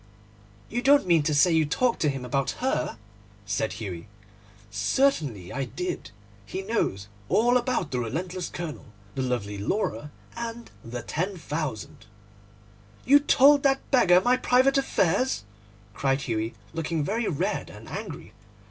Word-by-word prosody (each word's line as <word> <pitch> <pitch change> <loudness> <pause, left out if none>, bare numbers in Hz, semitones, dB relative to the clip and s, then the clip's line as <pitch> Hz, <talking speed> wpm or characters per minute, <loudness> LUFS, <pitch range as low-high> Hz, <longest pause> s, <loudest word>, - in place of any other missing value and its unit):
'You 240 - -2
don't 280 -2 +5
mean 170 -3 +4
to 150 +1 0
say 170 +5 +5
you 160 -1 +4
talked 235 +11 +1
to 150 - +2
him 135 -2 -4
about 135 +2 -1
her?' 245 - -1 0.5
said 100 +2 -1
Hughie. 95 -4 -6 0.6
'Certainly 110 - 0
I 135 -1 -2
did. 140 - -5 0.3
He 115 - -5
knows 145 - -1 0.2
all 240 +3 +4
about 245 - 0
the 125 - -1
relentless 175 +10 -3
colonel, 170 -4 -6 0.3
the 135 - -2
lovely 105 -6 -2
Laura, 115 - -2 0.3
and 235 0 -6
the 120 0 -6
£10,000.' 155 - -3 1.2
'You 285 +3 +7
told 285 0 +5
that 275 -1 +3
old - - -27
beggar 220 -10 +5
all 180 - +6
my 250 +5 +3
private 260 +3 +3
affairs?' 255 - +1 0.5
cried 135 +2 0
Hughie, 115 -2 -2 0.2
looking 165 -1 -1
very 220 +8 -1
red 150 - -1
and - - -12
angry. - - -7
165 Hz, 145 wpm, -26 LUFS, -, 1.2 s, You